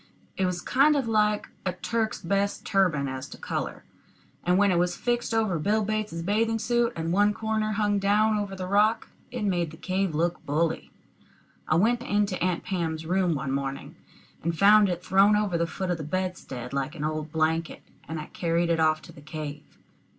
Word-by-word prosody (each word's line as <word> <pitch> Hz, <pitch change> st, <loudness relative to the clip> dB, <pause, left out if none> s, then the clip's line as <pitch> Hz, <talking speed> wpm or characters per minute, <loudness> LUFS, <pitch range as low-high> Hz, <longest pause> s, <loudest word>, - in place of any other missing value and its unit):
It 190 Hz, -, +1 dB
was 180 Hz, -1 st, -2 dB
kind 290 Hz, +3 st, +4 dB
of 270 Hz, -5 st, 0 dB
like 210 Hz, -1 st, +2 dB, 0.2 s
a 185 Hz, -, -1 dB
Turk's 220 Hz, +4 st, -2 dB
best 200 Hz, +3 st, 0 dB
turban 175 Hz, -8 st, +2 dB
as 130 Hz, +1 st, -5 dB
to -, -, -10 dB
color; -, -, -4 dB, 0.6 s
and 180 Hz, +1 st, +3 dB
when 200 Hz, 0 st, +4 dB
it 175 Hz, -, +2 dB
was 175 Hz, 0 st, 0 dB
fixed 240 Hz, -1 st, -1 dB
over 215 Hz, -7 st, +1 dB
Bill 210 Hz, +6 st, +1 dB
Bates's 215 Hz, -6 st, -2 dB
bathing 225 Hz, +4 st, +1 dB
suit, 240 Hz, +1 st, +1 dB
and 165 Hz, +1 st, -2 dB
one 205 Hz, +2 st, +3 dB
corner 220 Hz, -1 st, -1 dB
hung 205 Hz, -1 st, +1 dB
down 210 Hz, +2 st, +3 dB
over 200 Hz, -2 st, -4 dB
the 185 Hz, -1 st, -5 dB
rock, 210 Hz, +4 st, +2 dB, 0.2 s
it 245 Hz, -3 st, -4 dB
made 175 Hz, -5 st, 0 dB
the 160 Hz, -, -12 dB
cave 185 Hz, -2 st, -1 dB
look 170 Hz, +2 st, 0 dB
bully. 160 Hz, +3 st, -1 dB, 0.8 s
I 155 Hz, -, +2 dB
went 230 Hz, +8 st, +3 dB
into 205 Hz, -4 st, 0 dB
Aunt 180 Hz, -2 st, 0 dB
Pam's 165 Hz, -5 st, -2 dB
room 180 Hz, -1 st, +1 dB
one 140 Hz, -1 st, -3 dB
morning, 135 Hz, 0 st, -4 dB, 0.5 s
and 165 Hz, 0 st, -2 dB
found 205 Hz, +1 st, +6 dB
it 180 Hz, 0 st, -4 dB
thrown 195 Hz, +2 st, +5 dB
over 210 Hz, -4 st, 0 dB
the 170 Hz, 0 st, +1 dB
foot 180 Hz, +3 st, -3 dB
of 175 Hz, -, -2 dB
the -, -, -4 dB
bedstead, 155 Hz, -7 st, -4 dB
like 140 Hz, +4 st, -2 dB
an 150 Hz, -, -5 dB
old 155 Hz, 0 st, -3 dB
blanket, 160 Hz, +1 st, -1 dB, 0.2 s
and 160 Hz, -1 st, -4 dB
I 155 Hz, -, -5 dB
carried 170 Hz, 0 st, 0 dB
it 165 Hz, -, +1 dB
off 155 Hz, -1 st, +2 dB
to -, -, -12 dB
the 145 Hz, -, -14 dB
cave. 150 Hz, -1 st, -6 dB
185 Hz, 195 wpm, -27 LUFS, 160-210 Hz, 0.8 s, found